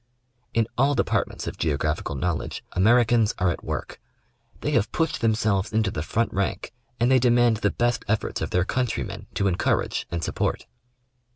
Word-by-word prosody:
In 115 -1 +3
all 140 +2 +4
departments - - -1
of - - -6
geographical 75 -1 -1
knowledge, 85 +1 -2
Americans 115 +2 +3
are 90 -3 +2
at - - -6
work. - - -5 0.6
They - - -1
have 105 - +1
pushed 165 -2 -1
themselves 110 -4 +1
into 110 -2 +1
the 75 - -3
front 115 +8 -1
rank 100 +4 -2 0.3
and 120 +2 +3
they 130 - +6
demand 120 -2 +4
the 105 -2 +1
best 120 +1 0
efforts 110 +1 -1
of - - -2
their 90 +1 +1
countrymen 125 +2 -2
to 100 - 0
encourage 90 -2 0
and 85 -1 -3
support. - - -1
110 Hz, 165 wpm, -25 LUFS, 90-120 Hz, 0.6 s, they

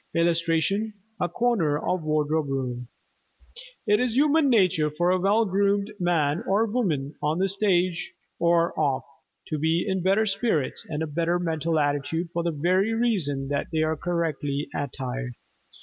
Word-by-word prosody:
[Illustration: 170 +5 +1 0.2
A - - 0
CORNER 180 -8 +1
OF 180 +3 -1
WARDROBE 155 0 0
ROOM] 125 -3 -3 1.0
It 210 0 +3
is 245 -2 0
human 295 0 +4
nature 185 -10 +3
for 175 +4 +1
a 185 - +2
well 205 +5 +3
groomed 200 +1 +1
man 170 -2 +1
or 205 +4 +3
woman, 170 - -1
on 150 +2 0
the 190 +1 +2
stage 185 -3 0 0.3
or 170 0 +3
off, 140 -4 +1 0.5
to 155 - -2
be 160 +3 +1
in 190 -1 0
better 195 +5 +3
spirits 200 - -1
and 155 0 -2
a - - 0
better 165 +3 0
mental 165 -2 -1
attitude 145 +3 -1
for 170 - -1
the 170 - 0
very 185 +8 +1
reason 160 - 0
that 145 0 -1
they 160 -1 +1
are 155 0 0
correctly 155 -4 -2
attired. 130 -2 -4
170 Hz, 155 wpm, -25 LUFS, 150-195 Hz, 1.0 s, human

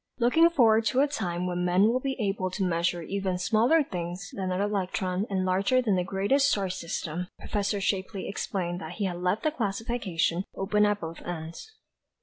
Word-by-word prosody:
Looking 290 +8 +5
forward 225 -8 +4
to 250 +5 +3
a 290 - +4
time 180 -11 -2
when 180 0 -1
man 180 +2 +3
will 235 +4 +3
be 270 0 -3
able 195 -3 -1
to 190 +1 -2
measure 170 0 0
even 190 0 -2
smaller 225 - +3
things 180 -3 -5
than 190 -1 -3
the 185 0 -1
electron 190 -1 -1
and 190 -2 0
larger 195 +7 +2
than 220 -6 +2
the 180 - +1
greatest 200 +10 +2
star 195 -6 0
system, 170 0 -4 0.2
Prof. 205 -2 -1 0.2
Shapley 195 0 -2
explained 180 -3 -3
that 160 +2 -6
he 205 +2 -2
had 175 -2 -3
left 180 +4 0
the 310 - +2
classification 200 - -1
"open 210 +2 +2
at 205 0 0
both 165 0 -6
ends." 165 - -7
195 Hz, 185 wpm, -27 LUFS, 180-220 Hz, 0.2 s, Looking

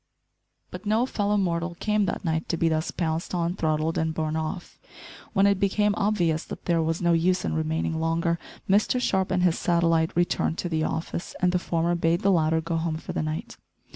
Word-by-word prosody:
But 215 - -8
no 220 +4 +3
fellow 210 -4 0
mortal 170 -2 -1
came 210 -1 +1
that 185 - -3
night 160 0 -1
to 170 - 0
be 165 0 +2
thus 160 0 0
pounced 165 +1 -2
on, 170 0 0
throttled, 155 -1 0
and 160 0 -1
borne 155 -1 -1
off. 160 +3 -4 0.5
When 195 -1 +4
it 200 -1 +3
became 205 +1 +2
obvious 180 -7 +1
that - - -9
there 170 -2 +2
was 165 +2 -1
no 170 0 +4
use 180 +2 +2
in - - -1
remaining 160 0 -1
longer, 165 +1 0 0.3
Mr 210 +6 +3
Sharp 190 -6 +1
and 180 - +1
his 175 -2 +2
satellite 165 -1 +2
returned 175 -1 +1
to 175 - -3
the 160 -2 0
office, 165 +2 -4
and 180 -1 +3
the 180 - +1
former 170 0 0
bade 170 +1 +1
the 200 - +3
latter 160 -2 +2
go 165 +1 -2
home 160 -1 -1
for - - -7
the - - -1
night. 155 0 -4
170 Hz, 205 wpm, -26 LUFS, 160-185 Hz, 0.5 s, When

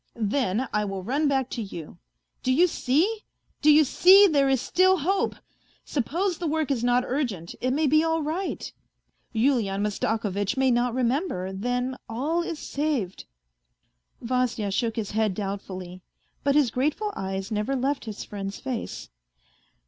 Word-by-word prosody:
Then 230 +1 0
I 210 0 +1
will 195 -2 -4
run 280 +9 +1
back 270 -3 +1
to 235 - -3
you. 175 -7 -8 0.4
Do 255 - 0
you 320 +8 +5
see, 350 - +1 0.4
do 305 - +6
you 305 +1 +7
see! 375 +8 +7
There 285 -7 +3
is 265 -2 +3
still 370 +8 +3
hope; 375 +6 0 0.5
suppose 335 - -1
the 345 - -2
work 310 -1 0
is 245 -4 0
not 245 +1 +3
urgent 235 - -3
it 255 - +1
may 295 +5 +1
be 310 +2 +4
all 325 -1 0
right. 330 +6 -3 0.6
Yulian 220 -5 +1
Mastakovitch 210 +1 -1
may 265 -1 +3
not 240 0 +1
remember, 245 - -1
then 245 +5 -2
all 290 +10 -1
is 340 -2 -4
saved." 280 -12 -2 1.0
Vasya 240 -4 -1
shook 225 +2 0
his 215 -3 -3
head 215 -3 +1
doubtfully. 185 -2 -5 0.4
But 280 0 +2
his 285 -6 +4
grateful 305 - -1
eyes 190 +2 -4
never 210 +6 -1
left 270 +1 -1
his 215 -2 -6
friend's 200 -1 -6
face. 255 -3 -5
255 Hz, 155 wpm, -26 LUFS, 210-300 Hz, 1.0 s, you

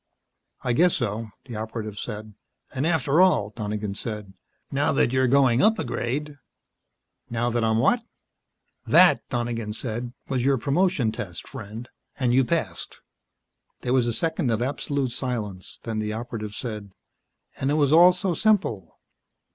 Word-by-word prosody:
"I 125 - +1
guess 175 +7 +4
so," 110 +2 -2 0.2
the 120 -4 -8
Operative 110 -1 -5
said. 105 -2 -6 0.4
"And 135 +3 0
after 160 -1 +3
all," 110 - +3
Donegan 105 -1 -3
said, 105 -2 -6 0.4
"now 140 +1 +1
that 130 -2 +2
you're 130 0 +3
going 130 -2 +4
up 220 +2 +4
a - - -2
grade 145 +5 -3 0.5
" - - -55
"Now 120 +1 0
that 120 0 0
I'm 110 0 +2
what?" 230 - +3 0.8
"That," - - +6
Donegan 120 -3 -2
said, 120 +1 -4 0.2
"was 130 -3 -1
your 135 +1 +3
promotion 145 -2 +1
test, 90 -6 -6
friend. 110 +4 -8 0.3
And 125 -2 +2
you 130 +1 +5
passed." 120 - -3 0.8
There 125 - -1
was 125 -2 +3
a - - +1
second 160 0 0
of 110 -2 +1
absolute 140 0 -1
silence. 110 -8 -5
Then 110 -2 -3
the 105 0 -2
Operative 110 -2 -5
said: 105 -5 -6 0.6
"And 135 - -1
it 145 - +2
was 145 -1 +3
all 175 +3 +9
so 180 0 -1
simple." 175 - +1
120 Hz, 155 wpm, -25 LUFS, 110-140 Hz, 0.8 s, all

